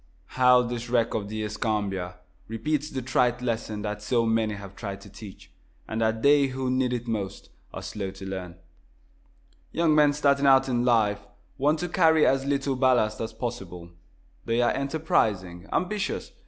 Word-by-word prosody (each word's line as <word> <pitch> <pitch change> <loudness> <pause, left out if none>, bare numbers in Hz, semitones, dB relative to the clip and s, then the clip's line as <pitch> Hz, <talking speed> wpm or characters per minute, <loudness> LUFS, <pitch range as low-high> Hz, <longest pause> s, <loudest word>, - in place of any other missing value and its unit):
How 125 -1 +5
this 120 0 -5
wreck 115 -1 +1
of 100 -2 -3
the 110 0 -3
"Escambia" 100 -4 -2 0.3
repeats 145 +7 -2
the 130 -3 -4
trite 125 -1 +1
lesson 110 -3 -3
that 105 0 -4
so 115 +2 +1
many 110 -1 +1
have 100 -1 -10
tried 100 -2 -6
to 100 - -13
teach, 100 -2 -12 0.4
and 110 +1 -3
that 110 0 0
they 140 -1 +5
who 130 -1 -3
need 130 -1 +1
it 120 -1 -3
most 105 -4 -4 0.2
are - - -7
so - - -6
slow 100 -2 -3
to 95 0 -10
learn! 95 -3 -6 1.2
Young 165 -1 +2
men 150 -1 +5
starting 140 -1 +2
out 135 0 +5
in 120 -2 0
life 110 -4 +2 0.4
want 150 +4 +3
to 180 - -1
carry 160 -3 +4
as 135 0 +2
little 140 -1 0
ballast 125 -5 +2
as 115 - -3
possible. 95 -7 -6 0.5
They 115 +1 0
are 120 - +3
enterprising, 105 - -1
ambitious. 200 +2 -2
115 Hz, 170 wpm, -26 LUFS, 105-135 Hz, 1.2 s, How